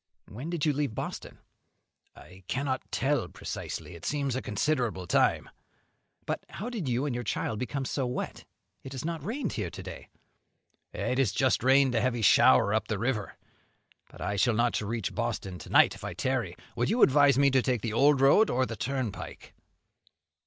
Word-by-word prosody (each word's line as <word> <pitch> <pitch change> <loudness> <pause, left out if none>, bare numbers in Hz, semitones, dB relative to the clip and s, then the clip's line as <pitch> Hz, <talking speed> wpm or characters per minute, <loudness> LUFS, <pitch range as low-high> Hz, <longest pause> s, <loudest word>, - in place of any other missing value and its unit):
"When 125 +10 -7
did 170 -3 -1
you 150 - +3
leave 140 -5 -2
Boston?" - - -6 0.8
"I 95 +1 -15
cannot 130 -1 -1
tell 135 -7 0
precisely; 90 - -6
it 85 0 -12
seems 140 -4 -1
a 130 - -2
considerable 115 -4 -1
time." - - +2 0.8
"But - - -3
how 225 +7 -6
did 195 - -3
you 125 +3 0
and 140 - -1
your 120 0 -3
child 110 0 -2
become 135 +2 -3
so 130 -1 -1
wet? 125 - -4 0.4
it 135 - -9
has 130 +2 -5
not 165 -3 -3
rained 240 - -3
here - - -3
to - - -9
day." - - -9 0.8
"It 130 - -2
has 125 -8 +3
just 130 -4 +1
rained 135 0 +4
a 115 - +2
heavy 120 -2 0
shower 95 0 +5
up 110 - 0
the 110 - -2
river. 110 -1 -2 0.7
But - - -14
I 100 +3 -2
shall 120 +3 +3
not 120 0 +1
reach 110 0 -3
Boston 95 -2 -3
to - - -11
night - - +5
if - - -12
I - - -5
tarry. - - -1 0.2
Would - - 0
you 230 +4 +3
advise 140 -1 +5
me 140 0 +4
to 130 0 +4
take 125 -4 -1
the 115 -2 -2
old 140 +3 +4
road, 175 +11 +5
or 130 +1 +1
the 115 - -5
turnpike?" 125 0 -5
130 Hz, 190 wpm, -28 LUFS, 110-140 Hz, 0.8 s, shower